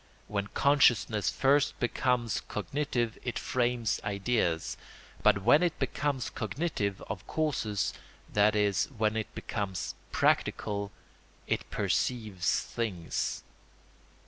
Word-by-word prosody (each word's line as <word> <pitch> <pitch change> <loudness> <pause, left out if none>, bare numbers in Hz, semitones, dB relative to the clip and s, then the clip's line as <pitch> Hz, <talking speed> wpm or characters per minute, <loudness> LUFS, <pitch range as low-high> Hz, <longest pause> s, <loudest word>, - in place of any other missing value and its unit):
When 100 -1 -2
consciousness 120 -6 +3
first 140 +2 +2
becomes 120 -2 +1
cognitive 120 0 -2
it 125 -2 -2
frames 120 -2 0
ideas; 100 -5 0 0.5
but 100 - +4
when 145 - +6
it 175 -2 +1
becomes 135 -1 -1
cognitive 110 - -2
of 95 -1 -6
causes, 130 -10 0 0.4
that 105 +1 +4
is, 100 -5 +2
when 110 -4 0
it 110 -1 -2
becomes 100 -4 -3 0.2
practical, 100 -1 +1 0.5
it - - -2
perceives 105 -8 0
things. 95 -8 -3
110 Hz, 100 wpm, -30 LUFS, 100-125 Hz, 0.5 s, when